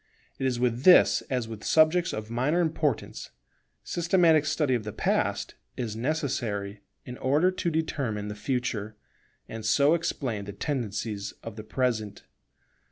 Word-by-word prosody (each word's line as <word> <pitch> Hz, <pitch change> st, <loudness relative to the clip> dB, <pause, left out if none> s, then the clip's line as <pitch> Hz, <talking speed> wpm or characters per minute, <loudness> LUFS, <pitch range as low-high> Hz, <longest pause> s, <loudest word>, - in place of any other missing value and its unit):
It 135 Hz, -, +1 dB
is 125 Hz, -2 st, -1 dB
with 120 Hz, -1 st, 0 dB
this 180 Hz, +4 st, +6 dB
as 125 Hz, -3 st, -1 dB
with 110 Hz, -2 st, -8 dB
subjects 160 Hz, +2 st, +3 dB
of 110 Hz, +1 st, -6 dB
minor 130 Hz, +8 st, +1 dB
importance: 155 Hz, -7 st, -1 dB, 0.5 s
systematic 170 Hz, -3 st, +3 dB
study 145 Hz, -2 st, +1 dB
of 120 Hz, -3 st, 0 dB
the 105 Hz, -, -5 dB
Past -, -, -1 dB, 0.2 s
is 115 Hz, -4 st, -3 dB
necessary 110 Hz, -7 st, -2 dB, 0.2 s
in 125 Hz, 0 st, -8 dB
order 150 Hz, +8 st, +3 dB
to 185 Hz, -1 st, -2 dB
determine 135 Hz, -10 st, -2 dB
the 105 Hz, -, -4 dB
Future, 110 Hz, -2 st, -3 dB, 0.5 s
and 110 Hz, 0 st, -7 dB
so 140 Hz, +7 st, +4 dB
explain 125 Hz, -10 st, -2 dB
the 100 Hz, -, -7 dB
tendencies 105 Hz, -7 st, -3 dB
of 115 Hz, -2 st, -7 dB
the 110 Hz, -, -7 dB
Present. 110 Hz, -3 st, -2 dB
125 Hz, 145 wpm, -27 LUFS, 110-155 Hz, 0.5 s, this